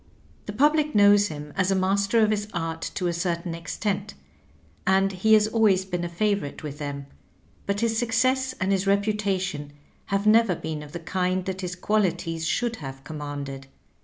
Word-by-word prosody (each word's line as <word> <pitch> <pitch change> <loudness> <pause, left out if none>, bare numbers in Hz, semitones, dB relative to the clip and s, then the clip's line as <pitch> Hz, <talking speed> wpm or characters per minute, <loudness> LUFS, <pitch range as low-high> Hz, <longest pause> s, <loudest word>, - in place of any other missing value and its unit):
The 205 - -4
public 300 +4 +2
knows 205 0 +6
him 150 -2 -8
as 190 -1 +1
a 195 - +2
master 200 +4 +2
of 215 0 +3
his 210 -1 -1
art 165 -1 -3
to 185 - -2
a 175 - +1
certain 170 0 -2
ex 165 0 -6
tent, 195 - -2 0.7
and 195 +1 +3
he 220 +4 +4
has 210 -1 +4
always 215 -4 +3
been 175 -2 -3
a 175 - -3
favorite 200 -5 -1
with 145 -1 -6
them; 140 -1 -5 0.6
but 200 +1 -1
his 225 -1 +1
success 255 +3 +1
and 185 +1 0
his 195 0 +1
reputation 195 -7 0 0.3
have 200 +1 -1
never 215 -3 +5
been 155 -1 -5
of 150 -1 -11
the 170 - -4
kind 185 +1 -1
that 190 0 -4
his 180 -1 -4
qualities 175 -5 0
should 235 +3 0
have 135 -2 -8
commanded. 145 -2 -6
190 Hz, 180 wpm, -25 LUFS, 165-210 Hz, 0.7 s, knows